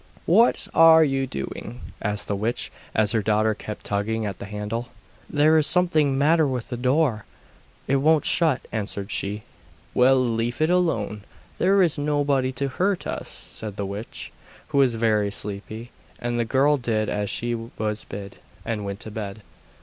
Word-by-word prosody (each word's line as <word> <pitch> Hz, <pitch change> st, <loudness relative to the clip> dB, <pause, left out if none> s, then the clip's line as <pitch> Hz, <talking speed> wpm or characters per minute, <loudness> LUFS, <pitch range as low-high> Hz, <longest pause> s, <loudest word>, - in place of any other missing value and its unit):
'What 225 Hz, +8 st, +4 dB
are 160 Hz, 0 st, +8 dB
you 135 Hz, -2 st, 0 dB
doing?' 110 Hz, -, -6 dB, 0.2 s
asked 105 Hz, 0 st, -2 dB
the 100 Hz, -, -1 dB
witch, 110 Hz, +4 st, -2 dB, 0.2 s
as 105 Hz, -1 st, +2 dB
her 110 Hz, -1 st, +1 dB
daughter 110 Hz, +1 st, +2 dB
kept 105 Hz, 0 st, -8 dB
tugging 110 Hz, +2 st, -1 dB
at 100 Hz, -3 st, -5 dB
the 100 Hz, -, -7 dB
handle. 105 Hz, +4 st, -4 dB, 0.4 s
'There 155 Hz, +2 st, +4 dB
is 155 Hz, -, +3 dB
something 160 Hz, -6 st, +3 dB
the -, -, -1 dB
matter 155 Hz, +2 st, +4 dB
with 125 Hz, -3 st, -3 dB
the 125 Hz, -, -3 dB
door; 125 Hz, -2 st, +1 dB, 0.6 s
it 140 Hz, -, +3 dB
won't 155 Hz, +2 st, +3 dB
shut,' 160 Hz, -6 st, +1 dB
answered 100 Hz, -2 st, -4 dB
she. 105 Hz, +2 st, -2 dB, 0.5 s
'Well, 130 Hz, +2 st, +5 dB
leave 120 Hz, -1 st, 0 dB
it 155 Hz, +2 st, +2 dB
alone; 115 Hz, -, 0 dB, 0.4 s
there 195 Hz, +1 st, +4 dB
is 160 Hz, -4 st, +1 dB
nobody 145 Hz, -3 st, +1 dB
to 140 Hz, +3 st, -1 dB
hurt 185 Hz, +8 st, -1 dB
us,' -, -, -4 dB
said 105 Hz, -3 st, -6 dB
the 100 Hz, -, -3 dB
witch, 100 Hz, +4 st, -7 dB, 0.4 s
who 140 Hz, -, +1 dB
was 130 Hz, -4 st, +4 dB
very 110 Hz, -2 st, +2 dB
sleepy; 105 Hz, +3 st, -6 dB, 0.3 s
and 120 Hz, 0 st, -2 dB
the 120 Hz, -, +1 dB
girl 140 Hz, +5 st, +3 dB
did 110 Hz, -4 st, -1 dB
as 105 Hz, -1 st, -2 dB
she 120 Hz, 0 st, -1 dB
was 110 Hz, -2 st, -4 dB
bid, 100 Hz, 0 st, -8 dB, 0.3 s
and 110 Hz, -3 st, -2 dB
went 100 Hz, 0 st, -5 dB
to 110 Hz, -, -7 dB
bed. 105 Hz, -1 st, -6 dB
120 Hz, 175 wpm, -24 LUFS, 105-145 Hz, 0.6 s, are